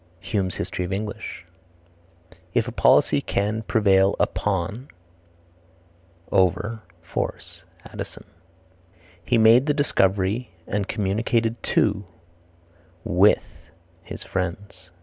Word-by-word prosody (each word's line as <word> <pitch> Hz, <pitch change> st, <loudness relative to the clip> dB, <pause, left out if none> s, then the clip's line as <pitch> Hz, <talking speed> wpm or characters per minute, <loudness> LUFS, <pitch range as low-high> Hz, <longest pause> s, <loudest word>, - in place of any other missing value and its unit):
Hume's 95 Hz, -1 st, -2 dB
History 90 Hz, -, -3 dB
of 90 Hz, -, -5 dB
England. 105 Hz, +2 st, -4 dB, 1.3 s
"If -, -, 0 dB
policy -, -, +4 dB
can 105 Hz, +2 st, -1 dB
prevail 100 Hz, -3 st, +3 dB
upon 105 Hz, +6 st, -1 dB, 1.4 s
(over) 105 Hz, +4 st, +1 dB, 0.2 s
force." 85 Hz, -, -5 dB, 0.2 s
Addison. -, -, -8 dB, 1.0 s
"He 120 Hz, -, +2 dB
made 115 Hz, +5 st, +6 dB
the 145 Hz, -, +2 dB
discovery 100 Hz, -4 st, +1 dB, 0.2 s
and 105 Hz, -1 st, -2 dB
communicated 115 Hz, +3 st, 0 dB, 0.2 s
to 100 Hz, -2 st, +2 dB, 1.0 s
(with) -, -, +4 dB, 0.6 s
his -, -, -8 dB
friends." 90 Hz, 0 st, -5 dB
100 Hz, 90 wpm, -24 LUFS, 95-110 Hz, 1.4 s, made